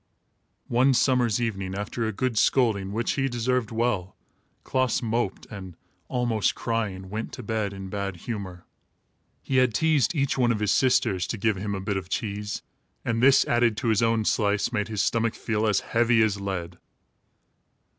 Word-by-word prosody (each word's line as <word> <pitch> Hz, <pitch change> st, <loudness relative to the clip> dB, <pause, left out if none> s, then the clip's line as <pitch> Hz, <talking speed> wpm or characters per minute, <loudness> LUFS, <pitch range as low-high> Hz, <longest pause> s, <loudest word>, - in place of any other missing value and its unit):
One 130 Hz, +3 st, +3 dB
summer's 120 Hz, -4 st, +2 dB
evening, 95 Hz, -5 st, -2 dB
after 105 Hz, +3 st, -3 dB
a -, -, -1 dB
good 120 Hz, +3 st, -2 dB
scolding, 105 Hz, -5 st, +2 dB
which 115 Hz, +3 st, -1 dB
he 135 Hz, 0 st, 0 dB
deserved 120 Hz, -1 st, 0 dB
well, 110 Hz, -5 st, -1 dB, 0.5 s
Klaas 130 Hz, -2 st, 0 dB
moped 115 Hz, -3 st, -1 dB
and, 95 Hz, -4 st, -8 dB, 0.3 s
almost 120 Hz, -6 st, 0 dB
crying, 105 Hz, -5 st, -2 dB
went 110 Hz, +2 st, -4 dB
to 125 Hz, -, -7 dB
bed 110 Hz, -2 st, -1 dB
in 95 Hz, -1 st, -7 dB
bad 100 Hz, -1 st, -3 dB
humor. 95 Hz, -2 st, -6 dB, 0.8 s
He 135 Hz, -, 0 dB
had 125 Hz, -3 st, +3 dB
teased 155 Hz, +2 st, +2 dB
each 140 Hz, -2 st, 0 dB
one 120 Hz, -1 st, +3 dB
of 115 Hz, -, 0 dB
his 105 Hz, -1 st, +1 dB
sisters 125 Hz, -8 st, +2 dB
to 115 Hz, -, -3 dB
give 110 Hz, +1 st, +1 dB
him 100 Hz, +1 st, -3 dB
her 100 Hz, -, -3 dB
bit 100 Hz, +1 st, -2 dB
of 95 Hz, -1 st, -6 dB
cheese, 105 Hz, -2 st, -3 dB, 0.4 s
and 115 Hz, -1 st, 0 dB
this, 135 Hz, +1 st, +6 dB
added 120 Hz, -2 st, +2 dB
to 115 Hz, +2 st, -1 dB
his 110 Hz, -1 st, +3 dB
own 115 Hz, -1 st, +2 dB
slice, 105 Hz, 0 st, +1 dB
made 105 Hz, -2 st, 0 dB
his 110 Hz, -2 st, -1 dB
stomach 115 Hz, -1 st, 0 dB
feel 110 Hz, -1 st, -1 dB
as 105 Hz, -2 st, +2 dB
heavy 115 Hz, -1 st, +3 dB
as 100 Hz, -2 st, 0 dB
lead. 90 Hz, -3 st, -4 dB
110 Hz, 175 wpm, -26 LUFS, 100-120 Hz, 0.8 s, this